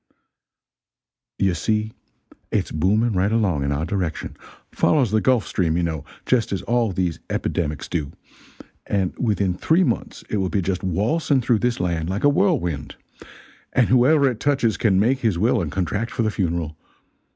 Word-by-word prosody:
"You 95 -2 +2
see 110 +6 -1 0.6
it's - - -1
booming 105 +9 +1
right 95 +2 +1
along 100 -11 +1
in 70 - -1
our 75 +3 -1
direction 90 -4 -3 0.4
follows 135 -9 +2
the 110 0 +2
Gulf 125 -5 +2
Stream, 85 -3 0
you 85 - +1
know, 80 -4 -2 0.2
just 120 -4 +1
as 95 - -2
all 120 -3 +1
those 90 -2 -2
epidemics 75 -3 -2
do, 70 -2 -3 0.8
and 95 -3 0
within 100 -6 +1
three 160 - +2
months - - -2
it 105 - -2
will 95 -2 0
be 100 -1 0
just 90 0 -2
waltzing 115 - +1
through 115 -2 +2
this 120 +1 0
land 85 -2 -1
like 95 +2 -3
a 145 - +6
whirlwind! 130 - 0 0.8
And 125 - +3
whoever 140 +4 +5
it 120 -4 -2
touches 135 -6 +1
can 95 -5 +2
make 125 +6 +2
his 110 -8 0
will 115 +4 +2
and 80 -4 -3
contract 95 +6 -2
for 115 - -2
the 110 - +1
funeral. 85 -6 -2
100 Hz, 170 wpm, -22 LUFS, 85-120 Hz, 0.8 s, a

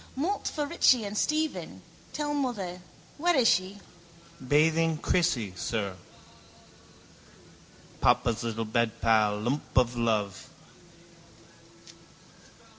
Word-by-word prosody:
—Malt 350 +10 -2
for 300 -2 -2
Richie 265 -6 +3
and 200 +1 -5
Stephen, 310 +7 -2 0.3
tell 295 -1 -3
mother. 210 -11 -3 0.4
Where 350 +2 +2
is 250 -4 +4
she? 185 +1 +1 0.7
—Bathing 160 +4 +2
Crissie, 130 - 0
sir. 100 +1 -3 2.0
Papa's 115 -1 +2
little 115 -1 -3
bedpal. 110 -2 +1
Lump 135 +3 -3
of 125 -1 +3
love. 110 -4 -1
155 Hz, 90 wpm, -28 LUFS, -, 2.0 s, is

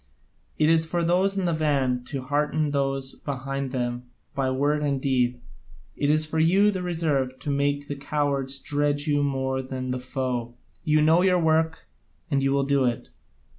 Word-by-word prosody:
It 155 - +3
is 160 0 +4
for 170 +1 -1
those 185 +4 +2
in 190 - 0
the 170 - +1
van 135 -5 +1
to 135 -1 -5
hearten 150 +2 0
those 135 -1 -1
behind 135 0 -4
them 125 -1 -3 0.2
by 135 -1 0
word 145 +3 +1
and 140 -2 0
deed; 125 -2 +1 0.6
it 145 - 0
is 155 +1 +2
for 160 +1 -2
you, 190 +6 +4
the 190 -2 -3
reserve, 155 -7 -1
to 145 - -2
make 145 0 0
the 145 - -4
cowards 140 -1 -1
dread 145 0 0
you 145 -1 +1
more 130 -1 -1
than 130 -1 -5
the 130 - -2
foe. 125 -2 -3 0.3
You 155 -1 +3
know 160 +3 +5
your 185 -1 +3
work, 160 0 +1 0.5
and 140 -1 +2
you 135 0 +1
will 140 0 +2
do 140 -1 +2
it. 120 -2 -1
145 Hz, 180 wpm, -25 LUFS, 130-155 Hz, 0.6 s, know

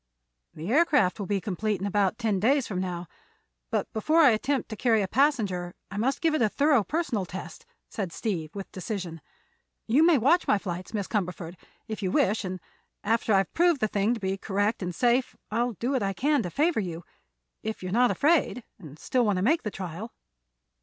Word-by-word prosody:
"The 165 +7 -5
aircraft 290 - +3
will 200 - -4
be 200 0 0
complete 210 +1 -2
in 195 - -3
about 200 0 +1
ten 220 -5 0
days 265 +6 +3
from 190 -3 -3
now; 180 -2 -3 0.6
but - - 0
before 310 +9 +3
I 285 -6 +7
attempt 260 +4 0
to 220 - -5
carry 225 -2 +2
a - - -2
passenger 205 -10 +1 0.2
I 195 - -6
must 265 - 0
give 325 -2 +2
it 310 - +1
a 220 - +4
thorough 285 -1 +3
personal 290 - -1
test," 185 +2 -8 0.2
said 195 -5 -4
Steve, 170 -6 -3
with 195 -1 -7
decision. 185 -4 -5 0.6
"You 260 +8 +4
may 335 -2 +6
watch 295 +9 +3
my - - +4
flights, 185 -2 -6
Miss 200 -3 -2
Cumberford, 180 -4 -3 0.3
if 220 -1 -5
you 190 - 0
wish, 205 +4 +2
and 185 -1 -4 0.4
after 225 +1 +1
I've 195 -2 +2
proved 345 -3 +3
the 215 - +1
thing 210 +3 +1
to - - -7
be 195 -1 -2
correct 205 +3 -1
and 180 -2 -4
safe 245 +4 +2 0.2
I'll 235 +2 0
do 240 +6 -3
what 265 -3 +1
I 195 -1 0
can 285 +7 +1
to 180 - -4
favor 310 - +1
you—if 165 - -8
you're 185 - -4
not 245 +4 +4
afraid, 295 -5 +2 0.2
and 150 -2 -11
still 250 +9 0
want 205 -3 +2
to 185 - 0
make 315 +10 +3
the 215 - -3
trial." 190 +3 -6
210 Hz, 200 wpm, -27 LUFS, 185-250 Hz, 0.6 s, I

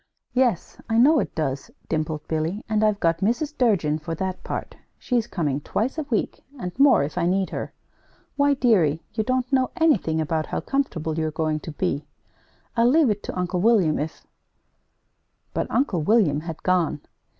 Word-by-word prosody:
"Yes, 245 -8 0
I 225 - +2
know 290 +6 +6
it - - -3
does," 140 -4 -2 0.2
dimpled 155 -1 -2
Billy, 160 +6 -2
"and 215 -1 +1
I've 210 -1 +2
got 165 -2 +1
Mrs. 280 - 0
Durgin 175 - +2
for 165 +1 -5
that 185 +2 -4
part. - - -5 0.2
She's 240 -3 -1
coming 150 - -2
twice 230 - -2
a - - -1
week, 225 - -1
and 180 -7 -4
more, 275 - +6
if 150 +5 -3
I 170 - +1
need 190 +1 0
her. - - -4 0.6
Why, 285 0 +3
dearie, 180 - +2
you 220 0 0
don't 255 +2 -1
know 260 -1 +3
anything 285 - +2
about 155 0 -1
how - - -2
comfortable 165 - -2
you're 155 0 0
going 155 0 -1
to 160 - -8
be! 150 0 -2 0.7
I'll 235 0 +4
leave 295 -3 +4
it 205 0 -3
to - - -5
Uncle 180 0 -1
William 200 -8 +3
if 155 +2 -5 0.7
" - - -48
But - - -2
Uncle 215 - +1
William 165 -5 +3
had 165 0 -7
gone. 180 -5 +1
185 Hz, 180 wpm, -24 LUFS, 160-240 Hz, 0.7 s, know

